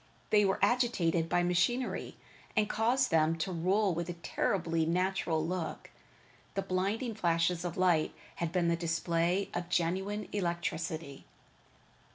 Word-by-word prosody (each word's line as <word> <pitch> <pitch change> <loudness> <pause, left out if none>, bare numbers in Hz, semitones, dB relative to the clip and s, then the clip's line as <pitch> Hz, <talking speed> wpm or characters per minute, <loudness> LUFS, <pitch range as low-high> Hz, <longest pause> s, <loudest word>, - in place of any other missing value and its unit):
They 210 -1 +5
were 190 - +1
agitated 195 -8 +2
by 175 - +2
machinery 180 +9 0 0.4
that 215 -2 +3
caused 235 +4 +1
them 160 0 +3
to 185 +4 -2
roll 185 +3 +2
with 170 +1 -3
a - - -2
terribly 165 0 -1
natural 175 -1 0
look. 175 -1 -4 0.6
The 195 - 0
blinding 195 +6 -1
flashes 170 -3 +1
of 175 -2 -4
lightning 175 -4 +2 0.2
had 170 -1 -2
been 175 -2 +1
the 170 - +3
display 170 +2 0
of 175 0 -3
genuine 190 +5 -1
electricity. 170 -5 -3
175 Hz, 135 wpm, -31 LUFS, 165-195 Hz, 0.6 s, They